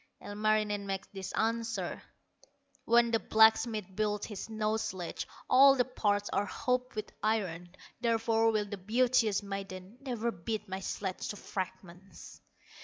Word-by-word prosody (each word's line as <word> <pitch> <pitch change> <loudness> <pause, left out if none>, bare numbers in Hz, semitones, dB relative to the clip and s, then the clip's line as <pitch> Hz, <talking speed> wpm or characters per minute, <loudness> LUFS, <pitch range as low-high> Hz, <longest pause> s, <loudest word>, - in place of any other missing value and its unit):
Ilmarinen 210 -1 0
makes 195 -1 -3
this 190 -1 -5
answer: 225 -4 -1 0.8
"When 235 0 +4
the 225 - +3
blacksmith 220 -1 +4
builds 210 0 0
his 210 -4 -6
snow 220 0 -1
sledge, 185 -5 -4 0.2
All 270 +1 +7
the 250 -2 +2
parts 205 -5 0
are 205 - +1
hooped 250 +2 -1
with 215 0 -4
iron; 185 -5 -1 0.2
Therefore 225 -1 +2
will 215 -1 0
the 205 0 -6
beauteous 220 +1 +2
maiden 195 +2 -7
Never 235 -4 -2
beat 215 +4 -4
my 190 0 -4
sledge 190 -1 -4
to - - -4
fragments." 185 -1 -7
215 Hz, 135 wpm, -31 LUFS, 195-225 Hz, 0.8 s, All